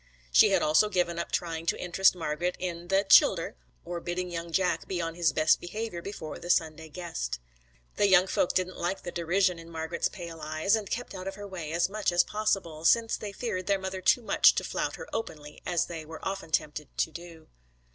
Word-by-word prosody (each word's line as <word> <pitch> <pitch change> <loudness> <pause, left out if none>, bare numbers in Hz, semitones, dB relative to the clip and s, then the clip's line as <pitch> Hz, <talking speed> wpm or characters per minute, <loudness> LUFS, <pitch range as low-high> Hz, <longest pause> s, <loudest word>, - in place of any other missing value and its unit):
She - - +7
had - - +2
also 155 +8 +4
given 175 -3 0
up - - -4
trying 165 -1 -2
to - - +1
interest 185 +2 +3
Margret 170 +1 -2
in 175 -1 -5
'the 195 +2 +3
childher,' - - +5 0.3
or 175 - -4
bidding 175 +1 -3
young 170 0 -5
Jack 185 +2 0
be 185 - -2
on 165 -1 -2
his 170 -2 +2
best 155 +1 +3
behaviour 210 0 -5
before 160 -6 -7
the 175 - -9
Sunday 160 -2 +1
guest. 145 - -4 0.6
The 205 - +4
young 190 -1 +6
folk 185 - 0
didn't 185 0 -1
like 175 +3 -2
the 175 - -5
derision 175 +1 +1
in 165 0 -11
Margret's 160 +1 -2
pale 170 -4 -8
eyes, 155 +7 +1
and 215 -3 -4
kept 245 -2 -4
out 185 0 -6
of 195 - -4
her 205 0 -8
way 170 -6 -6
as 170 +1 +2
much 210 0 -1
as 175 0 +4
possible, 195 -7 -2
since 225 +6 +4
they 210 - -6
feared 195 -3 -4
their 200 -1 +3
mother 190 0 -5
too 240 +6 +3
much - - +5
to - - 0
flout - - -2
her - - -9
openly, 150 -9 -6
as 175 -2 +1
they 165 -2 -6
were 160 +3 -7
often 195 -4 -4
tempted 150 -1 -2
to 160 - +1
do. 170 -1 -11
175 Hz, 215 wpm, -28 LUFS, 165-190 Hz, 0.6 s, She